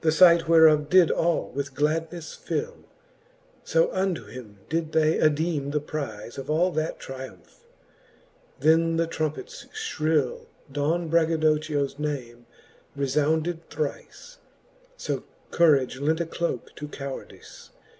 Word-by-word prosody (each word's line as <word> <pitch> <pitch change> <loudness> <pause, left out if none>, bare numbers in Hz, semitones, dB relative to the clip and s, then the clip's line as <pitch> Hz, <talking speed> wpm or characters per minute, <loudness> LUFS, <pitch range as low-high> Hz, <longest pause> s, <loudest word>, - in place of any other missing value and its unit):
The 160 - +4
fight 170 0 +6
whereof 155 -2 +6
did 180 -1 +6
all 170 -1 0
with 140 0 -4
gladnefle 160 +3 -2
fill: 485 +1 -4 0.8
So - - +2
unto 185 - -1
him 105 -2 -11
they 165 +1 0
did 160 -1 -12 0.3
addeeme 155 -2 +1
the 150 - +1
prife 140 -6 -6
Of 135 +2 -8
all 170 +4 +2
that 155 -1 -2
tryumph. 130 - -10 1.0
Then 165 +1 +3
the 165 - +2
trompets 160 - -4
fhrill 160 - -1 0.2
Don 155 +5 0
Braggadochio's 155 -3 +1
name 125 -6 -5 0.5
refounded 155 +4 0
thrife: 155 - -6 0.6
So - - -3 0.3
courage 140 -6 +3
lent 155 +3 +1
a 170 - 0
cloke 170 +1 -4
to 150 - -6
cowardife. 140 -2 -9
155 Hz, 120 wpm, -26 LUFS, 140-165 Hz, 1.0 s, fight